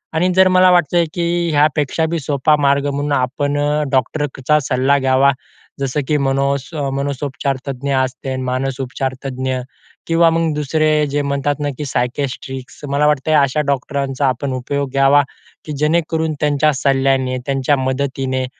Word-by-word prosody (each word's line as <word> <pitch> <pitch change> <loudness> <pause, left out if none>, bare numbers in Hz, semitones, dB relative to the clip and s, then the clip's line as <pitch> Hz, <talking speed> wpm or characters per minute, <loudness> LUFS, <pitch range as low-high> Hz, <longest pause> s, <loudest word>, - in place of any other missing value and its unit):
आणि 170 +3 +2
जर 190 0 +6
मला 185 0 +5
वाटतंय, 175 0 +3
की 170 0 0
ह्यापेक्षा 150 +1 +1
बी 170 - -1
सोपा 145 +1 +2
मार्ग 140 0 +2
म्हणून 145 +1 -2
आपण 140 +2 0 0.3
डॉक्टरचा 145 +2 0
सल्ला 130 +3 +2
घ्यावा 135 +1 +3 0.5
जसं 135 +1 -1
की 150 - +2
मनो 140 0 +1 0.4
मनोसोपचार 140 0 -2
तज्ज्ञ 140 +1 -3
असते, 130 0 -2
मानसोपचारतज्ज्ञ 130 0 -3 0.5
किंवा 165 0 +4
मग 165 -1 0
दुसरे 150 +1 +1
जे 145 +1 -1
म्हणतात 140 0 -1
ना, 145 - -1
की 150 - -4
सायकेस्ट्रिक्स 130 0 -4
मला 145 +2 +2
वाटतंय 150 +1 +2
अशा 140 +1 +3
डॉक्टरांचा 140 0 -1
आपण 130 +2 -1
उपयोग 140 +2 -2
घ्यावा, 135 +1 +4 0.4
की 155 - -6
जेणेकरून 160 +1 0
त्यांच्या 150 +1 +2
सल्ल्याने 135 -1 +1
त्यांच्या 135 +1 +1
मदतीने 130 0 -1
140 Hz, 135 wpm, -18 LUFS, 130-150 Hz, 0.5 s, जर